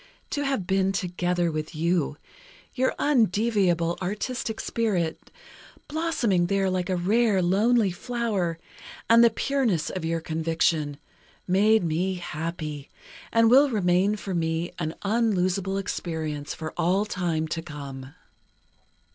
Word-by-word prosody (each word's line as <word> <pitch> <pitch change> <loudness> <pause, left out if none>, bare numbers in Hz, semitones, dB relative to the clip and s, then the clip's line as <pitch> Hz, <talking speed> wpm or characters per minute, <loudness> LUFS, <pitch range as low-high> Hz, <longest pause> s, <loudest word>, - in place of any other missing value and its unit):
To 290 - -1
have 270 -9 -1
been 190 +1 +2
together 175 -2 -1
with 155 0 -4
you, 165 -2 0 0.6
your 260 0 0
undeviable 205 - +2
artistic 220 +4 -3
spirit, 185 -8 -1 0.6
blossoming 255 - +1
there 195 0 +1
like 185 0 -1
a 185 - +1
rare 205 +3 +2
lonely 200 +4 +3
flower, 200 -4 -2 0.5
and 230 +1 +8
the 235 - +7
pureness 225 - 0
of 185 - -5
your 165 0 -1
conviction, 160 -2 0 0.5
made 210 +3 +4
me 175 +4 0
happy 155 -4 -5 0.4
and 230 0 +4
will 275 +5 +6
remain 195 -2 +2
for 195 -2 -5
me 165 0 -1
an 160 -1 -3
unlosable 195 -3 +1
experience 160 -6 -4
for 160 0 -6
all 190 +5 +1
time 170 -6 -1
to 165 - -2
come.... 140 -4 -9
185 Hz, 120 wpm, -26 LUFS, 165-215 Hz, 0.6 s, and